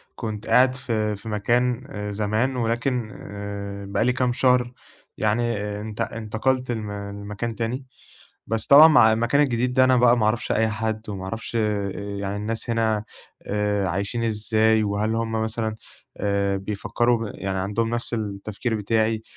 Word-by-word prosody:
كنت 110 -1 -5
قاعد 130 0 +5
في 110 -4 -1
في 100 +3 -9
مكان 120 +4 0 0.2
زمان 110 +5 0
ولكن 120 -1 -1
آآ، 100 -1 -6
بقى 100 +3 0
لي 125 - +3
كام 125 -1 +1
شهر 125 -1 +3 0.5
يعني 115 +1 +1 0.2
انت 105 -1 -6
انتقلت 120 +4 -1
لم 110 -3 -4
لمكان 100 +2 -5
تاني، 120 +4 -3 0.6
بس 115 0 -1
طبعًا 150 +2 +9
مع 120 -8 +6
المكان 115 +5 +2
الجديد 125 -3 +1
ده 130 0 +5
أنا 130 0 +4
بقى 120 0 +5
ما 110 - +2
أعرفش 110 +2 0
أي 110 0 +2
حد 110 0 -3
وما 95 -2 -5
أعرفش 110 +4 -5
آآ 105 -3 0 0.3
يعني 100 0 -3
الناس 110 +3 -3
هنا 110 -2 +1 0.4
آآ، 105 -1 0
عايشين 100 +6 -2
إزاي 110 0 +2
وهل 105 +2 0
هُم 115 0 -1
مثلًا 110 0 -2 0.4
آآ، 100 -1 0
بيفكروا 115 +3 0
يعني 95 -1 -3
عندهم 105 +4 -1
نفس 120 0 -3
التفكير 105 +2 -3
بتاعي 110 +1 0
110 Hz, 150 wpm, -24 LUFS, 105-120 Hz, 0.6 s, طبعًا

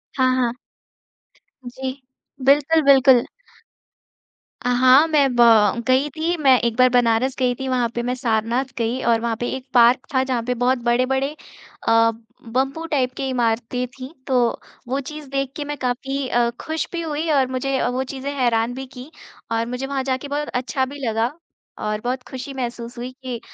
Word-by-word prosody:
हाँ, 255 -1 +3
हाँ। 245 -2 +1 1.1
जी, 260 +2 -5 0.5
बिल्कुल, 295 +3 +4
बिल्कुल। 260 -2 +5 1.4
अ, - - +2
हाँ, 260 +5 +6
मैं 295 -3 +3
ब 240 - +4 0.5
गई 265 +3 +3
थी 325 +3 -1
मैं 265 -4 +5
एक 235 -1 -1
बार 255 0 +6
बनारस 245 +1 +2
गई 250 -1 +2
थी 265 - -5
वहाँ 245 -2 +1
पे 240 - -1
मैं 250 - -1
सारनाथ 235 +1 0
गई 235 +3 -1
और 230 - +4
वहाँ 235 -1 -1
पे 240 - -2
एक 260 - -8
पार्क 240 +1 +5
था 260 0 +3
जहाँ 255 -3 -1
पर 250 +1 -1
बहुत 255 +1 +3
बड़े-बड़े 255 +3 +1 0.6
अ, 230 0 +5 0.4
बम्बू 270 +6 -1
टाइप 255 -3 +1
की 270 - -2
इमारतें 240 0 -1
थी 260 +3 -7 0.2
तो 255 -2 +2 0.5
वो 265 +2 -1
चीज़ 300 -2 -9
देख 275 -1 -2
के 295 - -4
मैं 295 0 -5
काफ़ी 265 +2 -2
अ, 240 0 +2
खुश 315 0 -3
भी 345 - -3
हुई 320 0 -3
और 270 -3 +3
मुझे 265 +1 -1
वो 255 +1 -1
चीज़ें 270 +1 -5
हैरान 235 -1 +1
भी 265 +1 -6
कीं 255 +4 -9 0.4
और 230 0 0
मुझे 250 +2 -4
वहाँ 270 -1 -2
जाके 260 +1 -2
बहुत 295 +1 -3
अच्छा 255 +1 -1
भी 285 +2 -9
लगा 225 +3 0 0.6
और 210 0 -2
बहुत 250 +2 -3
खुशी 260 +1 -7
महसूस 240 -2 -5
हुई 245 +2 -5
कि 250 -2 -4
255 Hz, 180 wpm, -21 LUFS, 240-275 Hz, 1.4 s, हाँ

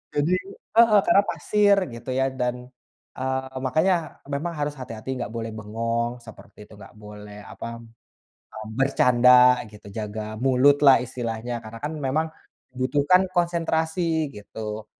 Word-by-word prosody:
jadi 150 +5 +1 0.4
heeh, 225 -3 +6
karena 200 - +5
pasir 205 -1 +3 0.2
gitu, 115 +3 -9
ya, 135 0 +2
dan, 125 0 0 0.6
eee, 130 0 -3
makanya 160 +8 +2 0.4
memang 155 +5 -2
harus 145 0 -1
hati-hati, 115 -1 -8
gak 115 -3 -4
boleh 115 -1 -4
bengong, 115 +2 -2
seperti 110 -2 -14
itu, - - -17
gak 100 +1 -14
boleh 105 0 -11
apa, - - -8
mmm, 115 0 -19 0.7
bercanda 125 -1 +5
gitu, 105 -1 -15
jaga 105 0 -4 0.2
mulutlah 135 +2 +5
istilahnya 120 -1 -4
karena, 110 +1 -10
kan, 150 - -2
memang 145 +3 0 0.5
membutuhkan 145 +8 +3
konsentrasi 165 -1 0
gitu, 105 +1 -7
130 Hz, 130 wpm, -24 LUFS, 115-150 Hz, 0.7 s, heeh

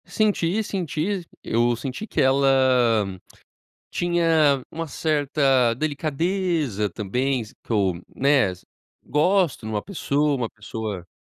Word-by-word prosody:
Senti, 210 -2 +1
senti, 180 0 -2 0.2
eu 120 +1 +1
senti 135 - -6
que - - -3
ela 135 +1 +4 1.4
tinha 165 -6 +2
uma 165 0 -4
certa 140 -5 +2
delicadeza 155 - -1
também, 125 +8 -1
s 110 - -11
que - - -9
eu, 100 -4 +2 0.2
né, 135 -8 +3 0.5
gosto 170 - +1
de 110 - -4
uma 105 -1 -1
pessoa, 150 -6 0
uma 120 -4 -2
pessoa 105 -4 -6
140 Hz, 110 wpm, -23 LUFS, 120-165 Hz, 1.4 s, ela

